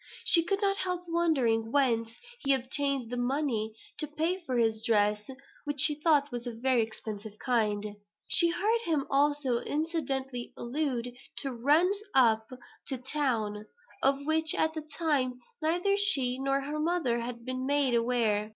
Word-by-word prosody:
She 335 Hz, -3 st, +7 dB
could 395 Hz, +4 st, -1 dB
not 395 Hz, 0 st, +2 dB
help 360 Hz, -2 st, -2 dB
wondering 265 Hz, -10 st, +1 dB
whence 235 Hz, -5 st, +1 dB, 0.3 s
he 275 Hz, -1 st, +2 dB
obtained 265 Hz, -1 st, -1 dB
the 245 Hz, -, -3 dB
money 245 Hz, -4 st, -1 dB, 0.2 s
to 305 Hz, -, 0 dB
pay 320 Hz, +5 st, -2 dB
for 260 Hz, -9 st, -3 dB
his 225 Hz, -1 st, +1 dB
dress, 210 Hz, -1 st, +1 dB, 0.3 s
which 290 Hz, -1 st, -4 dB
she 300 Hz, +2 st, +4 dB
thought 295 Hz, -2 st, +2 dB
was 240 Hz, 0 st, -5 dB
of 235 Hz, -, -5 dB
a -, -, -13 dB
very 255 Hz, -1 st, +2 dB
expensive 215 Hz, -1 st, -6 dB
kind. 215 Hz, -5 st, 0 dB, 0.4 s
She 340 Hz, -, +8 dB
heard 435 Hz, +7 st, +1 dB
him 315 Hz, -9 st, -1 dB
also 280 Hz, -3 st, +2 dB
incidentally 270 Hz, -6 st, -3 dB
allude 245 Hz, -2 st, -3 dB, 0.3 s
to 270 Hz, -2 st, -3 dB
"runs 315 Hz, -, +2 dB
up 220 Hz, -4 st, +4 dB, 0.4 s
to 265 Hz, -, -1 dB
town," 235 Hz, -6 st, -1 dB, 0.3 s
of 275 Hz, +1 st, +2 dB
which, 315 Hz, 0 st, +2 dB
at 315 Hz, 0 st, +1 dB
the 315 Hz, -, -5 dB
time, 290 Hz, -5 st, -1 dB, 0.2 s
neither 350 Hz, +5 st, +1 dB
she 270 Hz, -11 st, +3 dB
nor 275 Hz, +1 st, 0 dB
her 295 Hz, +2 st, -4 dB
mother 305 Hz, -7 st, 0 dB
had 235 Hz, 0 st, -6 dB
been 255 Hz, 0 st, -3 dB
made 280 Hz, -3 st, +2 dB
aware. 230 Hz, -3 st, +1 dB
270 Hz, 160 wpm, -29 LUFS, 235-310 Hz, 0.4 s, She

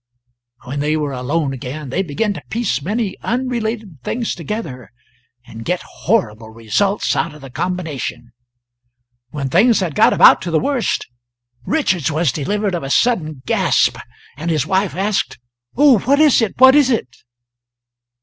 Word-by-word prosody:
When 135 Hz, +3 st, -5 dB
they 150 Hz, +2 st, 0 dB
were 150 Hz, -2 st, -2 dB
alone 135 Hz, +3 st, -1 dB
again 135 Hz, +3 st, -7 dB
they 155 Hz, +9 st, -1 dB
began 195 Hz, +5 st, -1 dB
to -, -, -8 dB
piece 220 Hz, -, -1 dB
many 205 Hz, +4 st, -3 dB
unrelated 230 Hz, -, -3 dB
things 235 Hz, -, -2 dB
together 160 Hz, -, -6 dB, 0.5 s
and 115 Hz, 0 st, -10 dB
get 180 Hz, +5 st, -2 dB
horrible 115 Hz, -, -2 dB
results 115 Hz, -, -1 dB
out 165 Hz, -3 st, -2 dB
of 150 Hz, -, -14 dB
the 135 Hz, -2 st, -11 dB
combination. 140 Hz, -6 st, -4 dB, 1.0 s
When 140 Hz, 0 st, -4 dB
things 210 Hz, -, +4 dB
had 180 Hz, -6 st, -2 dB
got -, -, +4 dB
about -, -, +6 dB
to 175 Hz, -, -4 dB
the 160 Hz, -2 st, +2 dB
worst 275 Hz, -, -1 dB, 0.6 s
Richards 185 Hz, -, 0 dB
was 155 Hz, -2 st, +1 dB
delivered 200 Hz, -, -2 dB
of 175 Hz, -, -2 dB
a 135 Hz, -, -6 dB
sudden 155 Hz, -, 0 dB
gasp -, -, +2 dB, 0.4 s
and 165 Hz, +4 st, -4 dB
his 155 Hz, -5 st, 0 dB
wife 190 Hz, 0 st, 0 dB
asked: 200 Hz, +2 st, -1 dB, 0.4 s
"Oh, 275 Hz, -5 st, +6 dB
what 280 Hz, +8 st, +2 dB
is 300 Hz, -5 st, +5 dB
it? 220 Hz, -4 st, -1 dB
what 260 Hz, +1 st, +8 dB
is 290 Hz, -2 st, +4 dB
it?" 220 Hz, -, -1 dB
175 Hz, 155 wpm, -18 LUFS, 140-220 Hz, 1.0 s, what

